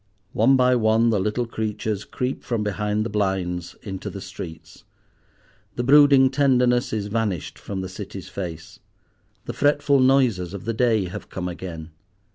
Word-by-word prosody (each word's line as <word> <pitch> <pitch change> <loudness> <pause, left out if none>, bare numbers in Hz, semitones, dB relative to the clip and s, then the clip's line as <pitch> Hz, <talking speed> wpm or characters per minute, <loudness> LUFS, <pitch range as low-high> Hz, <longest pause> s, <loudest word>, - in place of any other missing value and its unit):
One 120 +5 +4
by 125 -1 +4
one 115 0 +3
the 105 - +1
little 105 +5 -1
creatures 110 -2 -3
creep 125 +1 -4
from 115 -4 -2
behind 105 +1 -1
the - - -3
blinds 95 -4 -2
into 95 -3 -5
the - - -7
streets. 80 -1 -9 0.9
The 120 - -2
brooding 140 -1 +6
tenderness 125 -3 +2
is 105 -2 -2
vanished 105 -5 -2
from 95 -2 -5
the 95 - -4
City's 95 0 -8
face. 85 -1 -7 0.7
The - - -5
fretful 145 -1 +2
noises 125 -9 +2
of 100 - -8
the 115 - -1
day 110 -3 +2
have 90 - -8
come 90 -1 -4
again. 85 -2 -7
110 Hz, 155 wpm, -23 LUFS, 95-125 Hz, 0.9 s, brooding